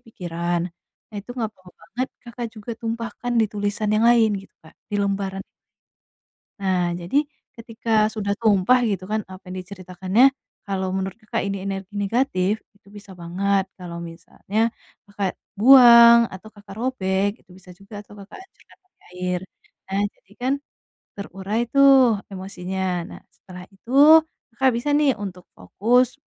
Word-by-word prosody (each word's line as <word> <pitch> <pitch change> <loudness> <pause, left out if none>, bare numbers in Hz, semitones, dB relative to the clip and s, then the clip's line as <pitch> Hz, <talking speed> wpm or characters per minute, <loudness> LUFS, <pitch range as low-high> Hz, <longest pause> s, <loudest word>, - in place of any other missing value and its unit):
pikiran. 175 -4 -3 0.5
Nah, 210 - -10
itu 235 - -14
nggak 225 -3 -1
apa-apa 185 -1 -18
banget, 245 +10 -4 0.2
Kakak 240 0 -6
juga 215 +2 -9
tumpahkan 230 +1 -4
di 220 - +3
tulisan 205 +1 -2
yang 215 - +2
lain, 230 -2 +5
gitu - - -19
Kak. 160 - -17 0.2
Di 205 - -1
lembaran. 195 -1 -2 1.2
Nah, 180 -3 0
jadi, 270 - +1 0.3
ketika 225 -2 0
sudah 200 -2 -2
tumpah, 220 +3 +3
gitu 195 -4 -2
kan, 215 0 -1
apa 185 +1 -11
yang 185 0 -6
diceritakannya, 190 +7 +1 0.3
kalau 190 -1 -2
menurut 190 +2 -3
Kakak 215 - -3
ini 195 -1 -4
energi 195 +1 -5
negatif, 205 -1 0 0.2
itu 200 - -29
bisa 205 -1 -13
banget 190 +3 0
kalau 175 -2 -8
misalnya 170 +5 -6 0.5
Kakak 200 -2 -3 0.2
buang, 235 -2 +8
atau 190 +3 -11
Kakak 205 -2 -13
robek, 200 -6 0
itu - - -38
bisa 185 -1 -15
juga, 205 +2 -11
atau 205 - -17
Kakak 200 0 -12
hancurkan 380 - -21
pakai 375 - -45
air. 180 0 -2 0.5
Nah, 200 +1 0
jadi 195 - -32
kan, 260 +2 +1 0.6
terurai 200 +2 -4
tuh, 265 -6 +5
emosinya. 190 0 -5 0.2
Nah, - - -11
setelah 180 +1 -12
itu, 230 +6 -12 0.6
Kakak 265 +1 +3
bisa 290 +5 -2
nih, 290 -5 +2
untuk 180 -3 -7
fokus 240 - +1
200 Hz, 150 wpm, -22 LUFS, 190-230 Hz, 1.2 s, buang